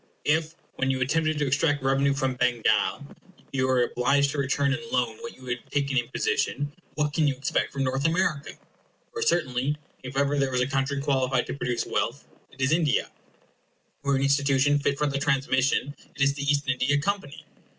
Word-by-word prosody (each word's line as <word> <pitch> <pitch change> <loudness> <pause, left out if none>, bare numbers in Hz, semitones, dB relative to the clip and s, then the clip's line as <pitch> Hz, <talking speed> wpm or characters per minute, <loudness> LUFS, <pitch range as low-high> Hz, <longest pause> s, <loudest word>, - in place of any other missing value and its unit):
If, 160 +2 +1 0.2
when 130 - 0
you 130 -1 0
attempted 155 +4 +1
to 150 - +1
extract 145 +1 +1
revenue 135 +1 +2
from 135 -2 0
Bengal, 120 0 +1 0.5
you 130 -1 +1
were 130 -1 +3
obliged 140 +4 +2
to 145 - -3
return 140 0 +1
in 150 - -2
loan 115 -3 0
what - - -8
you 130 - -15
had 125 -1 -2
taken 140 -1 -1
in 120 -2 +2
imposition, 145 - -1 0.2
what 150 -1 0
can 155 -1 +2
you 140 - +1
expect 135 +2 -1
from 135 - -2
North 135 +3 +1
America? 165 -4 0 0.6
For 455 - -4
certainly, 135 - +1 0.2
if 130 +1 -7
ever 140 +1 +2
there 135 -1 +2
was 125 -1 0
a - - +3
country 135 +1 -1
qualified 130 -2 +1
to - - -5
produce 125 -4 -2
wealth, - - -2 0.2
it 130 - -21
is 130 +2 +2
India; 160 -3 +1 0.9
or 140 0 +1
an 135 - 0
institution 140 0 +3
fit 140 0 0
for 150 - +1
the 140 -1 -1
transmission, 135 0 +1 0.2
it - - -7
is 140 0 +3
the 140 - -6
East 145 0 +1
India 135 +2 +2
Company. 160 -3 -3
140 Hz, 190 wpm, -26 LUFS, 130-145 Hz, 0.9 s, were